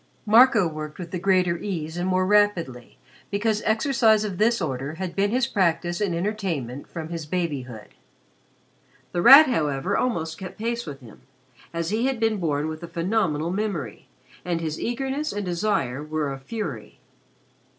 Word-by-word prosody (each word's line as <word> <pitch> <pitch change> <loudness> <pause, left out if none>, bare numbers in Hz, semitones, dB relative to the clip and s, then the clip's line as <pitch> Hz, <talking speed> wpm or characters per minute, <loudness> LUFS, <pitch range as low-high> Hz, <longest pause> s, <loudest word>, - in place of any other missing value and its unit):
Marco 225 -2 +6
worked 155 -1 -7
with 170 -2 -8
the 180 - -3
greater 180 -2 +2
ease 165 -5 -4
and 175 +1 -2
more 185 0 +2
rapidly, 185 - +1 0.3
because 210 +1 0
exercise 220 -2 +3
of 195 -4 -4
this 235 +2 +3
order 140 -2 -3
had 180 -1 -5
been 200 +1 +2
his 250 +3 +1
practice 175 -3 0
and 190 -5 0
entertainment 170 - -3
from 160 -2 -6
his 165 -3 -5
babyhood. 140 - -4 1.2
The 175 - -1
Rat, 275 - +10
however, 150 - 0
almost 165 -10 -1
kept 185 -2 -8
pace 235 -1 -3
with 140 -2 -8
him, 115 -4 -15 0.5
as 170 +1 -3
he 230 +4 +1
had 265 -3 -2
been 225 -1 +1
born 155 -4 -1
with 155 0 -6
a 170 - -7
phenomenal 170 -2 -1
memory 185 - -4 0.4
and 175 -2 -1
his 155 -2 -4
eagerness 270 +5 -2
and 205 -1 -4
desire 170 -8 -1
were 150 -2 -2
a 135 - -8
fury. 215 +11 -6
180 Hz, 160 wpm, -24 LUFS, 155-215 Hz, 1.2 s, Rat